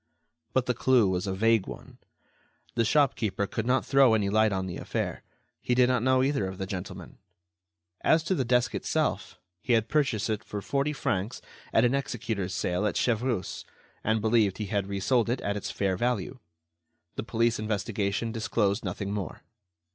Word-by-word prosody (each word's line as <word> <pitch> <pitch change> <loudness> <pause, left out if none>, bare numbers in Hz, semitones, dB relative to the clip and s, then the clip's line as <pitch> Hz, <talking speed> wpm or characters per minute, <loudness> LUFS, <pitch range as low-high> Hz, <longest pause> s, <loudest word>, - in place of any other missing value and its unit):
But 130 -1 +2
the 125 - +1
clue 120 -2 +3
was 95 +1 -1
a 95 - -1
vague 115 0 +3
one. - - -10 0.7
The 115 - +2
shopkeeper 115 -6 +2
could 110 +3 -4
not 130 +1 +2
throw 135 -4 +5
any 100 -2 +1
light 110 0 +4
on 95 -1 -1
the 90 -2 -5
affair. - - -3 0.4
He 125 - 0
did 125 0 +5
not 125 -2 +2
know 130 +1 +3
either 135 -8 +1
of 95 0 -6
the 95 - -3
gentlemen. 95 0 -7 0.8
As 160 0 +4
to 180 - 0
the 140 - +1
desk 125 -2 +2
itself, - - -1 0.2
he 125 - +1
had 110 -1 +2
purchased 135 -9 +1
it 110 -1 -2
for 105 - -5
forty 140 +7 -1
francs 105 -7 -2 0.3
at - - +4
an 120 - +2
executor's 115 -8 -2
sale 90 +4 0
at - - -1
Chevreuse, 120 -3 -1 0.4
and 110 0 +1
believed 110 -3 +2
he 105 - -3
had 100 -1 0
resold 110 +4 +1
it 125 +2 0
at 100 - -1
its 105 - -4
fair 95 -2 0
value. 125 +2 -1 0.8
The - - -2
police 115 0 +1
investigation 105 0 -1
disclosed 110 -2 0
nothing 100 +1 -3
more. 100 -5 -5
110 Hz, 175 wpm, -28 LUFS, 100-125 Hz, 0.8 s, throw